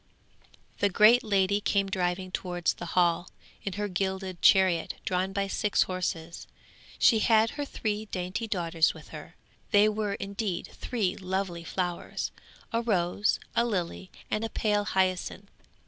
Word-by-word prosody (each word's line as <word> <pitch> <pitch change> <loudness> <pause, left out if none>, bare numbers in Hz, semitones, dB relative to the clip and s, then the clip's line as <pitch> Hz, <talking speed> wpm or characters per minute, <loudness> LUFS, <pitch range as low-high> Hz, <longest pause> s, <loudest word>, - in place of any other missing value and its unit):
'The 200 - +3
great 220 +6 +6
lady 200 -1 +2
came 200 -1 +1
driving 185 -1 -1
towards 175 -2 -1
the 175 - -7
Hall, 175 0 +3 0.3
in 200 - -3
her 205 +2 -2
gilded 190 -1 -3
chariot 185 -4 +4
drawn 185 +1 0
by 200 0 -1
six 205 +1 +1
horses. 170 -2 -4 0.5
She 225 - +5
had 220 0 +4
her 290 -1 -4
three 215 -5 -3
dainty 185 +3 -4
daughters 170 -5 +1
with - - -13
her; - - -10 0.3
they 205 -1 +5
were 210 -1 -1
indeed 200 -2 -3
three 210 -7 -2
lovely 185 -2 -3
flowers. 175 0 -3 0.4
A 230 - +2
rose, 205 -3 +1 0.2
a 235 - +4
lily 185 -4 -3 0.2
and 215 - 0
a 225 - -2
pale 210 -2 0
hyacinth. 190 0 -1
195 Hz, 145 wpm, -28 LUFS, 180-210 Hz, 0.5 s, great